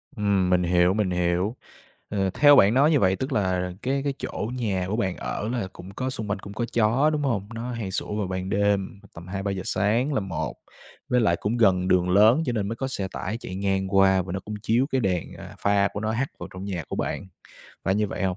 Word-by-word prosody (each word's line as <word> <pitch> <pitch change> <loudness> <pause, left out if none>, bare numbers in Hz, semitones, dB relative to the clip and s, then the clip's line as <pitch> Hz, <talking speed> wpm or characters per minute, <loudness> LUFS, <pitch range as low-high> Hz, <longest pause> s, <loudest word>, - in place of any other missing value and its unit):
Ừm, 100 -3 +1
mình 90 -1 +3
hiểu, 90 +1 +3
mình 100 -3 0
hiểu. 90 +5 0 0.5
Ờ, 95 -2 0
theo 145 -1 +7
bạn 105 +1 +6
nói 145 +4 +5
như 145 - +3
vậy 95 0 +3
tức 130 +1 -4
là 90 -5 0
cái 135 +2 0
cái 140 - 0
chỗ 105 - -4
nhà 100 -7 -1
của 110 - -1
bạn 95 -6 -1
ở 105 - -4
là 115 -6 -2
cũng 95 - -11
có, 130 0 -2
xung 110 -5 -5
quanh 105 - 0
cũng 100 0 -9
có 120 +3 -2
chó, 120 +7 +3
đúng 150 -1 -1
hông? 105 -7 -1
Nó 120 +2 -4
hay 110 -5 -4
sủa 105 - -3
vào 105 -3 -1
ban 95 0 -4
đêm, 100 0 0
tầm 85 +2 -10
2:00-3:00 95 0 -3
sáng 115 +9 +1
là 135 - +1
một. 95 -5 -4 0.5
Với 125 0 +3
lại 85 -6 +3
cũng 110 +4 -1
gần 95 -5 +3
đường 90 -1 +3
lớn 110 - +5
cho 125 - 0
nên 105 -3 -1
mới 115 - -3
có 135 +1 -3
xe 95 -7 -3
tải 110 +5 -3
chạy 95 - -7
ngang 95 0 0
qua, 95 -1 +5
và 90 0 -7
nó 95 - -3
cũng 105 +2 -7
chiếu 120 +5 +2
cái 130 - +2
đèn, 90 -5 -1
à, - - -10
pha 100 0 +2
của 100 - -4
nó 110 0 -1
hắt 125 +5 -1
vào - - -7
trong 95 +1 -7
nhà 90 -6 -4
của - - -4
bạn, - - -3 0.6
phải 95 - +2
như 105 0 +1
vậy 95 - -5
hông? 95 -1 0
100 Hz, 250 wpm, -25 LUFS, 95-115 Hz, 0.6 s, theo